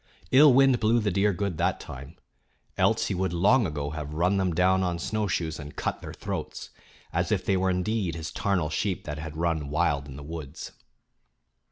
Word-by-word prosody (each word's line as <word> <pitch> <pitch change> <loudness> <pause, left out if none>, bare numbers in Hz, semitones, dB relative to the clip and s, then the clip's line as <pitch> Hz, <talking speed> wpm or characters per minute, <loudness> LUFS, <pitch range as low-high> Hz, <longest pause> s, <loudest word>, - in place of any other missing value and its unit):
Ill 145 +2 +8
wind 135 -1 +5
blew 115 +2 +3
the 105 -2 0
deer 100 +3 +2
good 100 -2 -3
that - - +1
time; 70 +5 -10 0.6
else - - +2
he - - -1
would 95 -1 -1
long 105 +6 +4
ago 75 -2 -4
have 75 -1 -6
run 90 +5 +2
them 95 -2 +1
down 90 +3 +3
on 90 -2 -1
snowshoes 85 -4 -2
and 75 -1 -9
cut - - -3
their - - -7
throats, - - -6 0.4
as - - 0
if - - 0
they 95 - +2
were 95 0 +1
indeed 90 -1 -1
his 80 -1 -5
"tarnal 95 -6 0
sheep" 95 +4 -1
that 75 -1 -5
had 80 0 -7
run 80 -3 -1
wild 70 -1 0
in 65 - -9
the 70 - -9
woods. 75 -1 -7
90 Hz, 195 wpm, -27 LUFS, 75-100 Hz, 0.6 s, Ill